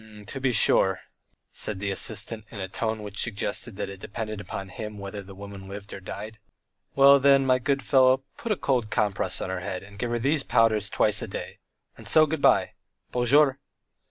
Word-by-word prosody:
"To 135 +5 -6
be 130 -1 +2
sure," 95 -4 +4 0.5
said 105 - -4
the 100 0 -2
assistant, 110 +2 0
in 110 - -9
a 95 - -3
tone 110 +3 -3
which 105 0 -5
suggested 105 0 -3
that - - -4
it 100 -1 -9
depended 110 +1 -6
upon 95 0 -7
him 105 +2 -7
whether 100 +1 -7
the 95 0 -13
woman 100 -1 -10
lived 100 0 -9
or - - -7
died. 105 +3 -8 0.6
"Well, 140 0 +7
then, 135 0 +4
my 130 -1 +3
good 135 +1 -1
fellow, 130 -1 +4
put 230 - -5
a - - +3
cold 125 - 0
compress 105 -3 -1
on 95 - -3
her 95 - -3
head, 90 0 -5
and 100 0 -14
give 120 - -2
her 120 - 0
these 140 +5 +1
powders 110 -5 +2
twice 105 +1 +2
a - - -4
day, - - -7 0.4
and - - -7
so 155 -1 +7
good 155 -1 -3
bye. - - +4 0.4
Bonjour." 135 +3 +3
110 Hz, 200 wpm, -26 LUFS, 100-130 Hz, 0.6 s, Well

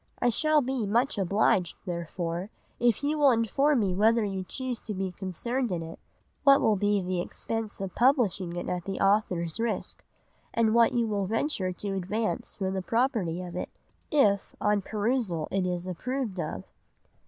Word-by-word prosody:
I 245 - +3
shall 310 +5 +3
be 250 -4 -1
much 235 +3 +1
obliged 195 -1 +2
therefore 170 +1 -3 0.3
if 240 +2 +2
you 300 +1 0
will 285 -2 +6
inform 255 +4 +2
me 190 -3 +1
whether 220 +4 +3
you 195 -2 -3
choose 255 +4 -4
to 210 - -6
be 190 0 -2
concerned 215 +7 -3
in 170 -2 -2
it, 165 0 -9 0.4
what 275 -1 +7
will 215 - +3
be 205 0 +1
the 180 -1 -1
expense 225 +4 -4
of 195 -2 -4
publishing 225 - +2
it 175 - -4
at 180 -1 -3
the 195 - -4
author's 190 -4 +1
risk, 230 -1 -2 0.5
and 225 -1 +3
what 235 0 +5
you 235 -1 +2
will 205 -3 -1
venture 220 -4 0
to 195 +2 -4
advance 215 +5 -2
for 190 -1 -2
the 190 0 -2
property 205 -6 0
of 175 -1 -8
it, 180 - -3 0.4
if 205 - +2
on 210 -1 +2
perusal 210 -6 -1
it 190 -1 0
is 180 0 -3
approved 225 +2 -3
of. 155 - -3
205 Hz, 175 wpm, -28 LUFS, 185-235 Hz, 0.5 s, what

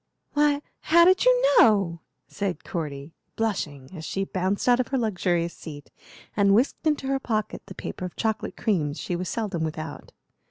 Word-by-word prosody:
"Why, 290 0 +2 0.2
how 340 +2 +5
did 370 +5 +4
you - - +5
know?" 195 -7 +4 0.3
said 200 -3 -3
Cordy, 150 -3 -5 0.2
blushing, 150 -12 -2
as 165 -3 -8
she 195 +4 -2
bounced 190 +2 -1
out 245 0 +5
of 250 - +1
her 270 - -1
luxurious 180 -7 0
seat 145 -3 -10 0.4
and 200 -1 +4
whisked 260 +7 +1
into 300 -3 +1
her 270 0 0
pocket 215 -5 -2
the - - -9
paper 185 - -5
of 180 - -7
chocolate 220 -2 -2
creams 160 -8 0
she 175 - -3
was 180 0 -3
seldom 205 -8 -2
without. 155 -1 -5
195 Hz, 170 wpm, -25 LUFS, 170-245 Hz, 0.4 s, how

